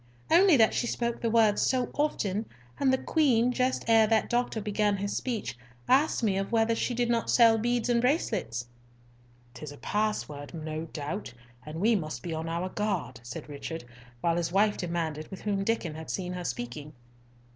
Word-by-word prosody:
"Only 345 Hz, -2 st, +7 dB
that 225 Hz, -2 st, +5 dB
she 240 Hz, -, 0 dB
spake 235 Hz, -1 st, -2 dB
the 230 Hz, -, +1 dB
words 220 Hz, -2 st, +4 dB
so 255 Hz, -2 st, +1 dB
often; 215 Hz, -8 st, -1 dB, 0.3 s
and 270 Hz, -2 st, +3 dB
the 260 Hz, -, +3 dB
Queen, 250 Hz, -6 st, +2 dB
just 255 Hz, +1 st, 0 dB
ere 225 Hz, -1 st, +6 dB
that 220 Hz, 0 st, +1 dB
doctor 240 Hz, -2 st, 0 dB
began 210 Hz, -1 st, 0 dB
his 200 Hz, +1 st, -3 dB
speech, 220 Hz, -, -3 dB, 0.3 s
asked 270 Hz, 0 st, +3 dB
of -, -, +4 dB
me 195 Hz, -2 st, +1 dB
whether 225 Hz, +3 st, +1 dB
she 240 Hz, +2 st, -1 dB
did 240 Hz, 0 st, +1 dB
not 235 Hz, -1 st, 0 dB
sell 230 Hz, -2 st, +6 dB
beads 240 Hz, +1 st, 0 dB
and 240 Hz, -1 st, +2 dB
bracelets." 180 Hz, -, 0 dB, 0.9 s
"'Tis 150 Hz, +3 st, -8 dB
a 145 Hz, -, -11 dB
password, 180 Hz, -9 st, -2 dB
no 155 Hz, 0 st, -4 dB
doubt, 155 Hz, -, -5 dB, 0.4 s
and 155 Hz, +2 st, -6 dB
we 220 Hz, +4 st, +4 dB
must 155 Hz, -6 st, -4 dB
be 170 Hz, -2 st, -4 dB
on 160 Hz, +1 st, -3 dB
our 170 Hz, +3 st, -2 dB
guard," 185 Hz, -, -2 dB
said 135 Hz, +7 st, -8 dB
Richard, 150 Hz, +2 st, -6 dB, 0.4 s
while 170 Hz, 0 st, +1 dB
his 170 Hz, -1 st, -1 dB
wife 205 Hz, +2 st, +3 dB
demanded 165 Hz, -3 st, -3 dB
with 190 Hz, -, -8 dB
whom 200 Hz, -2 st, 0 dB
Diccon 195 Hz, -7 st, -1 dB
had 160 Hz, +1 st, -8 dB
seen 180 Hz, -2 st, -3 dB
her 180 Hz, -1 st, -5 dB
speaking. 125 Hz, +5 st, -5 dB
205 Hz, 185 wpm, -28 LUFS, 160-235 Hz, 0.9 s, Only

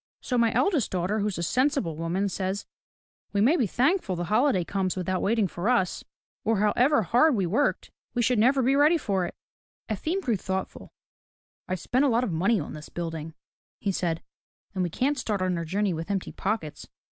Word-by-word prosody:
So 250 Hz, -, -3 dB
my 230 Hz, -2 st, +3 dB
eldest 340 Hz, -, +2 dB
daughter 185 Hz, +4 st, -1 dB
who's 205 Hz, -2 st, -1 dB
a 170 Hz, -, -2 dB
sensible 255 Hz, -, +1 dB
woman, 170 Hz, +5 st, -1 dB
says: 190 Hz, +1 st, -3 dB, 0.7 s
*We 200 Hz, -, +1 dB
may 250 Hz, +11 st, +5 dB
be 250 Hz, -11 st, +1 dB
thank 285 Hz, -, +2 dB
ful 185 Hz, -, -3 dB
the 175 Hz, -, -3 dB
holiday 235 Hz, -6 st, +3 dB
comes 190 Hz, +1 st, -1 dB
without 185 Hz, 0 st, -1 dB
waiting 220 Hz, -1 st, +2 dB
for 175 Hz, +5 st, -2 dB
us, 215 Hz, -8 st, +1 dB, 0.4 s
or, 225 Hz, 0 st, +1 dB
however 230 Hz, +6 st, +3 dB
hard 250 Hz, -, +4 dB
we 195 Hz, -4 st, +1 dB
worked, 225 Hz, +12 st, 0 dB, 0.2 s
we 240 Hz, -, +2 dB
should 245 Hz, -1 st, +2 dB
never 260 Hz, +4 st, +4 dB
be 265 Hz, +3 st, +3 dB
ready 300 Hz, +4 st, +5 dB
for 195 Hz, -, -1 dB
it.' -, -, -10 dB, 0.3 s
" -, -, -35 dB
Efim 315 Hz, -, -1 dB
grew 240 Hz, -, 0 dB
thoughtful. 190 Hz, +1 st, -5 dB, 0.8 s
"I've 185 Hz, 0 st, -2 dB
spent 255 Hz, +8 st, +1 dB
a -, -, +4 dB
lot 235 Hz, +1 st, +2 dB
of 215 Hz, -, -1 dB
money 190 Hz, +7 st, +2 dB
on 150 Hz, -, -6 dB
this 150 Hz, 0 st, -9 dB
building," 165 Hz, -2 st, -5 dB, 0.4 s
he 200 Hz, -, 0 dB
said, 170 Hz, -3 st, -2 dB, 0.5 s
"and 190 Hz, -, -2 dB
we 175 Hz, -, 0 dB
can't 270 Hz, -, 0 dB
start 210 Hz, -5 st, -1 dB
on 185 Hz, -1 st, 0 dB
our 170 Hz, -1 st, -3 dB
journey 195 Hz, +3 st, 0 dB
with 165 Hz, +3 st, -5 dB
empty 195 Hz, -2 st, -2 dB
pockets. 190 Hz, -7 st, -3 dB
205 Hz, 205 wpm, -26 LUFS, 180-250 Hz, 0.8 s, may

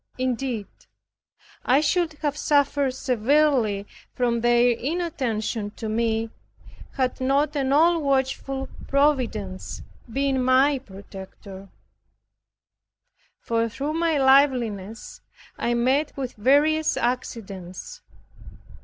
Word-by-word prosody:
Indeed, 255 Hz, -3 st, -2 dB, 1.0 s
I 260 Hz, +3 st, +4 dB
should 320 Hz, +2 st, +1 dB
have 290 Hz, -1 st, 0 dB
suffered 285 Hz, -3 st, +1 dB
severely 250 Hz, -4 st, +1 dB, 0.3 s
from 240 Hz, -2 st, 0 dB
their 240 Hz, +1 st, +4 dB
inattention 240 Hz, -7 st, -2 dB
to 225 Hz, -, -5 dB
me 225 Hz, 0 st, -1 dB, 0.6 s
had 260 Hz, -1 st, -1 dB
not 280 Hz, +3 st, +1 dB
an 270 Hz, -2 st, 0 dB
all 330 Hz, +3 st, +4 dB
watchful 270 Hz, -1 st, -1 dB, 0.2 s
Providence 250 Hz, -10 st, 0 dB, 0.3 s
been 270 Hz, +1 st, 0 dB
my 265 Hz, +2 st, +4 dB
protector: 195 Hz, -2 st, -11 dB, 1.7 s
for 230 Hz, 0 st, 0 dB
through 280 Hz, +7 st, -4 dB
my 330 Hz, -1 st, +1 dB
liveliness, 250 Hz, -7 st, +2 dB, 0.4 s
I 240 Hz, -, 0 dB
met 265 Hz, +6 st, +1 dB
with 260 Hz, -2 st, -4 dB
various 295 Hz, +7 st, +2 dB
accidents. 200 Hz, -7 st, -4 dB
255 Hz, 90 wpm, -24 LUFS, 225-285 Hz, 1.7 s, I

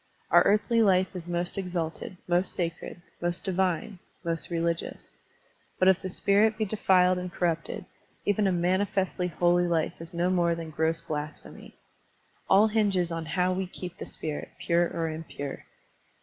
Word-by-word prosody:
Our -, -, +8 dB
earthly 215 Hz, +3 st, +3 dB
life 190 Hz, -2 st, +3 dB
is 175 Hz, -2 st, -6 dB
most 175 Hz, +2 st, -2 dB
exalted, 180 Hz, -1 st, -4 dB
most 175 Hz, +1 st, +1 dB
sacred, 170 Hz, 0 st, -4 dB, 0.2 s
most 175 Hz, 0 st, -1 dB
divine, 190 Hz, +2 st, -1 dB, 0.3 s
most 165 Hz, -1 st, +1 dB
religious. 170 Hz, 0 st, -2 dB, 0.7 s
But 185 Hz, -, +3 dB
if 190 Hz, -1 st, +3 dB
the 185 Hz, -, -4 dB
spirit 210 Hz, +4 st, +3 dB
be 220 Hz, -, 0 dB
defiled 185 Hz, -3 st, +3 dB
and 180 Hz, 0 st, -5 dB
corrupted, 175 Hz, +3 st, -2 dB, 0.4 s
even 205 Hz, 0 st, +2 dB
a -, -, +2 dB
manifestly 185 Hz, +1 st, 0 dB
holy 175 Hz, +1 st, +2 dB
life 165 Hz, -2 st, 0 dB
is 165 Hz, -, -5 dB
no 175 Hz, +1 st, 0 dB
more 170 Hz, -2 st, +2 dB
than 165 Hz, -1 st, -7 dB
gross 160 Hz, +2 st, 0 dB
blasphemy. 150 Hz, -2 st, -7 dB, 0.7 s
All 200 Hz, +3 st, +6 dB
hinges 200 Hz, -5 st, +1 dB
on 165 Hz, -1 st, -4 dB
how 180 Hz, 0 st, +3 dB
we 190 Hz, 0 st, -2 dB
keep 180 Hz, -1 st, -8 dB
the -, -, -6 dB
spirit, 150 Hz, -2 st, -5 dB
pure 175 Hz, 0 st, +2 dB
or 165 Hz, -1 st, -2 dB
impure. 155 Hz, -3 st, -6 dB
180 Hz, 155 wpm, -28 LUFS, 170-190 Hz, 0.7 s, Our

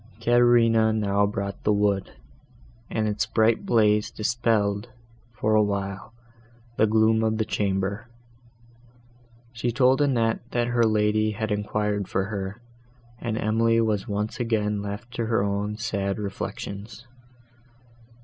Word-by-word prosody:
Caterina 115 Hz, -1 st, +4 dB
now 100 Hz, -2 st, +1 dB
brought 100 Hz, -1 st, -4 dB
the 105 Hz, -, +2 dB
wood, 100 Hz, -2 st, 0 dB, 0.8 s
and 110 Hz, -1 st, -1 dB
its 105 Hz, 0 st, -1 dB
bright 110 Hz, 0 st, +2 dB
blaze 105 Hz, -2 st, +3 dB
dispelled, 110 Hz, -1 st, 0 dB, 0.4 s
for 110 Hz, 0 st, -1 dB
a 110 Hz, -, +5 dB
while, 100 Hz, 0 st, -3 dB, 0.6 s
the 110 Hz, -, +3 dB
gloom 110 Hz, +1 st, +3 dB
of 110 Hz, 0 st, +1 dB
the 110 Hz, -, 0 dB
chamber. 100 Hz, +2 st, -2 dB, 1.5 s
She 120 Hz, 0 st, -2 dB
told 130 Hz, +3 st, +3 dB
Annette, 115 Hz, -6 st, +1 dB
that 120 Hz, 0 st, 0 dB
her 120 Hz, -1 st, +2 dB
lady 110 Hz, 0 st, +2 dB
had 110 Hz, +1 st, -3 dB
enquired 105 Hz, -1 st, -1 dB
for 95 Hz, -, -1 dB
her, 100 Hz, +2 st, -4 dB, 0.6 s
and 115 Hz, -2 st, -3 dB
Emily 115 Hz, +1 st, +2 dB
was 110 Hz, -3 st, 0 dB
once 105 Hz, +3 st, -3 dB
again 105 Hz, -3 st, 0 dB
left 105 Hz, +4 st, -6 dB
to 115 Hz, -1 st, -2 dB
her 110 Hz, -3 st, +1 dB
own 100 Hz, +1 st, -2 dB
sad 100 Hz, -3 st, -2 dB
reflections. 100 Hz, +2 st, -6 dB
110 Hz, 130 wpm, -25 LUFS, 100-115 Hz, 1.5 s, a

